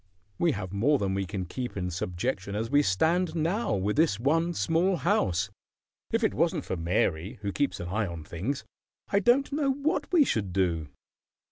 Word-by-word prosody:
We 170 -3 +3
have 95 -4 -5
more 135 +9 +3
than 100 -5 -1
we 95 -1 -1
can 95 0 -3
keep 125 +5 -5
in 90 -1 -2
subjection 95 +3 -3
as 115 +3 -2
we 145 0 +5
stand 160 - +1
now, 170 - 0
with 100 +4 -1
this 155 -10 +3
one 165 +7 +1
small 170 +5 +2
house. 100 - +1 0.6
If 230 +1 +1
it 220 - +2
wasn't 165 -2 +1
for - - -2
Mary, 85 +1 0
who 100 - -1
keeps 145 +7 -1
an 85 - -5
eye 105 +2 0
on 85 -2 -6
things, 95 - -4 0.4
I 200 - +3
don't 245 +8 +3
know 280 -1 +1
what 285 +5 -1
we 330 -5 +6
should 100 - -1
do." 85 -5 0
115 Hz, 190 wpm, -28 LUFS, -, 0.6 s, we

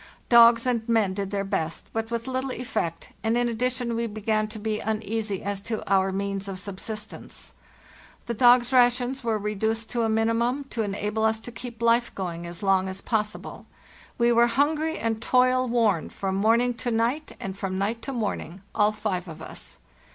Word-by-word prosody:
Dogs 235 0 +7
and 235 -2 0
men 220 -5 +3
did 195 0 -3
their 200 -1 -1
best, 180 -5 -2
but 225 0 -2
with 235 0 -3
little 260 0 -2
effect, 170 -9 -3
and 225 +1 +2
in 245 0 +2
ad 230 -2 -3
dition 250 -1 0
we 230 0 -1
began 215 0 0
to 215 +1 -9
be 215 0 -2
uneasy 215 -1 -2
as 200 0 -3
to 220 +1 -4
our 190 -1 +3
means 195 0 -3
of 195 -1 -5
sub 195 0 -6
sistence. 215 +1 -7 0.7
The 235 - -2
dogs' 245 +2 +5
rations 250 +1 +3
were 225 -2 +1
reduced 220 +2 -2
to 240 - 0
a 225 - +1
minimum, 230 +5 +1
to 230 - -1
enable 210 +1 -2
us 220 0 +2
to 245 - -8
keep 235 -1 -8
life 235 +1 +3
going 175 -3 -4
as 170 +4 -8
long 190 -1 +3
as 190 0 -4
possible. 210 0 -3 0.5
We 235 0 +4
were 235 0 +5
hungry 300 +6 +1
and 225 -1 -1
toil 255 +1 +3
worn 225 -8 +2
from 195 -1 -3
morning 230 +5 +3
to 245 - -1
night 240 +7 0
and 190 -1 -5
from 195 -1 -3
night 215 +4 -1
to 275 - -5
morning, 200 -6 -3
all 210 0 +3
five 195 -4 -3
of 160 - -9
us. - - -10
225 Hz, 190 wpm, -26 LUFS, 200-240 Hz, 0.7 s, Dogs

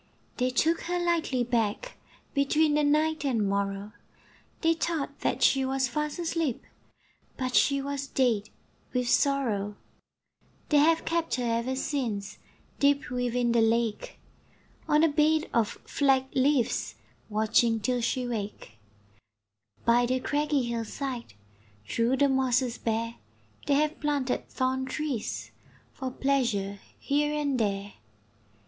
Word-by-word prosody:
They 250 0 +1
took 320 +6 +1
her 355 +1 -1
lightly 335 -7 +1
back, 235 - -1 0.4
Between 295 +2 +2
the 300 0 +2
night 305 +1 +2
and 230 -7 +1
morrow, 200 +1 -2 0.7
They 330 -1 +4
thought 325 -3 -3
that - - 0
she 270 -1 +4
was 265 0 0
fast 300 +4 -3
asleep, 330 -6 -1 0.7
But 255 -1 -2
she 275 +1 +3
was 280 0 -3
dead 230 -7 +1 0.4
with 250 -1 0
sorrow. 235 -8 +1 0.9
They 295 - +5
have 325 +2 +3
kept 330 0 0
her 250 - -2
ever 235 +2 0
since 240 -8 -3 0.4
Deep 280 -2 +2
within 245 -1 0
the 235 -1 +3
lake, 225 -1 0 0.7
On 300 0 +4
a - - +6
bed 310 +1 +2
of 230 -3 +3 0.2
flag 270 -2 +2
leaves, 255 - +1 0.3
Watching 220 +2 +2
till 245 +3 0
she 250 +2 -1
wake. 205 - -6 1.1
By 240 +1 +4
the 255 +1 +1
craggy 290 0 0
hill 235 -1 -2
side, 245 - -5 0.5
Through 235 +3 +1
the 285 - +4
mosses 255 -2 +1
bare, 230 +1 -2 0.5
They 285 - +3
have 305 +2 +1
planted 285 -4 -1
thorn 260 0 -1
trees 270 -4 -3 0.4
For 260 -2 -4
pleasure 240 -8 0 0.2
here 295 +1 0
and 285 -4 0
there. 200 -2 -1
260 Hz, 130 wpm, -28 LUFS, 230-290 Hz, 1.1 s, a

